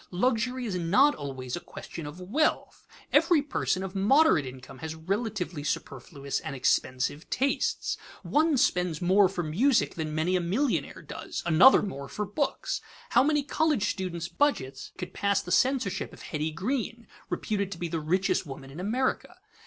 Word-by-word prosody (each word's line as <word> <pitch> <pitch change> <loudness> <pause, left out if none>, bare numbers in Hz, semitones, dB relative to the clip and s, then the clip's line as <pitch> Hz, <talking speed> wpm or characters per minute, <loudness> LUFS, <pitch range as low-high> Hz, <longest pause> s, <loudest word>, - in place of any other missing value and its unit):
Luxury 250 +5 0
is 210 - -3
not 190 - +4
always 130 -3 -5
a - - -4
question 165 -2 -8
of 150 +5 -9
wealth. 240 +13 -1 0.3
Every 330 -6 +5
person 190 -9 -1
of 190 -1 -5
moderate 205 - +4
income 130 +1 -10
has 160 +2 -5
relatively 185 -2 -3
superfluous 140 0 -3
and 140 - -6
expensive 130 +3 0
tastes. 275 +2 0 0.3
One 310 -1 +2
spends 180 - +1
more 185 +2 +4
for 180 -2 -3
music 230 - +2
than 155 -2 -4
many 165 +4 +1
a 180 - +2
millionaire 225 +11 -1
does; - - -6
another 175 +11 +7
more 140 -9 -5
for 210 - -3
books. 285 - -2 0.3
How - - +5
many 295 +1 +2
college 300 -6 +1
students' 175 -3 -4
budgets 140 - -1
could 180 -1 -6
pass 200 -1 +1
the 180 - -7
censorship 245 -7 +1
of - - -12
Hetty 155 0 -2
Green, 230 - -3 0.2
reputed 200 -2 -2
to 180 - -5
be 175 - -3
the 165 0 -2
richest 185 +5 +1
woman 135 -3 -9
in 150 - -9
America? 255 - -1
185 Hz, 160 wpm, -28 LUFS, 160-250 Hz, 0.3 s, another